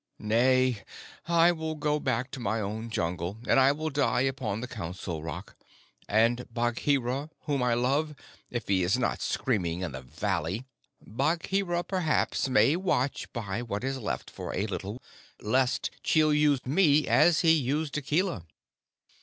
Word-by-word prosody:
Nay, 125 +1 +2 0.4
I 170 0 +5
will 160 -2 -3
go 150 0 0
back 130 -1 -1
to 135 - -6
my 110 -1 -1
own 110 +3 -4
Jungle, 85 -1 -2
and - - +5
I 135 +1 +6
will 155 +2 -3
die 135 -4 +1
upon 130 -6 -1
the 125 - -5
Council 90 - -5
Rock, 80 - -7 0.5
and 115 +4 +2
Bagheera, 125 +4 0
whom 145 -3 -1
I 125 -1 +2
love, 140 +5 0 0.3
if 120 -3 -4
he 95 -2 +2
is 90 +7 +2
not 125 - -1
screaming 90 -9 -1
in 90 -4 -3
the 65 0 -7
valley 85 - -3 0.4
Bagheera, 175 - 0
perhaps, 175 -7 0
may 130 +4 +4
watch 170 -7 -1
by 110 -2 -4
what 110 -2 -4
is 135 0 -2
left 110 - -4
for - - -6
a 100 - 0
little, 105 +3 -5 0.4
lest 125 +4 +1
Chil 155 -1 +3
use 150 -3 +2
me 150 +1 +3
as 170 -3 +4
he 165 - +5
used 150 +1 0
Akela." 150 - -1
125 Hz, 155 wpm, -28 LUFS, 105-150 Hz, 0.5 s, I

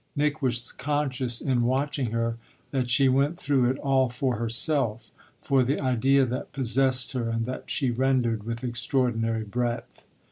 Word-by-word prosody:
Nick 150 +1 0
was 125 -2 -1
conscious 130 -4 -1
in 130 -3 +1
watching 130 +1 0
her 115 0 -1 0.3
that 130 -3 -1
she 135 +3 +4
went 140 +5 +2
through 135 -7 +2
it 130 - -1
all 135 -2 +2
for 125 0 -1
herself, 115 -1 0 0.3
for 135 -2 +3
the 135 +4 0
idea 130 +1 +3
that 125 +1 -5
possessed 130 0 +2
her 120 -3 -2
and 115 0 -1
that 130 +1 -6
she 135 -4 0
rendered 120 -3 +1
with 115 +2 -5
extraordinary 120 -2 -1
breadth. 120 +2 -4
125 Hz, 155 wpm, -26 LUFS, 115-135 Hz, 0.3 s, she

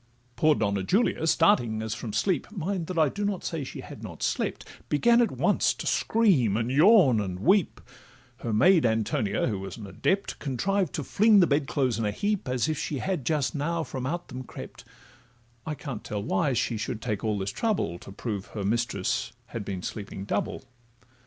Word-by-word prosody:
Poor 155 -1 +4
Donna 100 -2 0
Julia, 180 - +1
starting 120 -10 +3
as 110 -1 -3
from 115 0 -5
sleep 165 - 0
(Mind—that 185 -2 -3
I 155 -2 +5
do 205 +8 -4
not 200 -2 -1
say—she 155 -5 -4
had - - -10
not - - -7
slept), - - -1 0.2
Began 235 +11 +4
at 235 - +3
once - - +2
to - - -7
scream, 160 - +2
and 115 +2 -1
yawn, 150 - +6
and 90 -2 -4
weep; 190 - +2 0.6
Her 115 - -4
maid 170 - +5
Antonia, 110 -2 0
who 105 -5 -1
was 95 -1 -7
an 110 - -8
adept, 190 - -1
Contrived 180 +6 -1
to 150 - -2
fling 210 - +4
the 180 - +6
bed 145 -2 +1
clothes 130 -6 0
in 115 - 0
a - - +1
heap, 205 - -2
As 125 +2 0
if 155 -2 -1
she 145 - -3
had 170 -3 -2
just 150 -4 +1
now 165 +3 -1
from 130 -4 -5
out 175 +4 -4
them 125 - -6
crept: 130 - -10 0.8
I 155 - -2
can't 130 -8 -6
tell 105 -1 -4
why 115 +7 +1
she 120 -1 0
should 105 +1 -3
take 105 -2 -3
all 110 -2 0
this 95 0 -2
trouble 195 - -1
To - - -11
prove 100 0 -4
her 105 - -5
mistress 110 +1 -1 0.2
had 115 -3 -3
been 95 -3 -5
sleeping 100 -2 -6
double. - - -2
130 Hz, 190 wpm, -27 LUFS, 110-175 Hz, 0.8 s, yawn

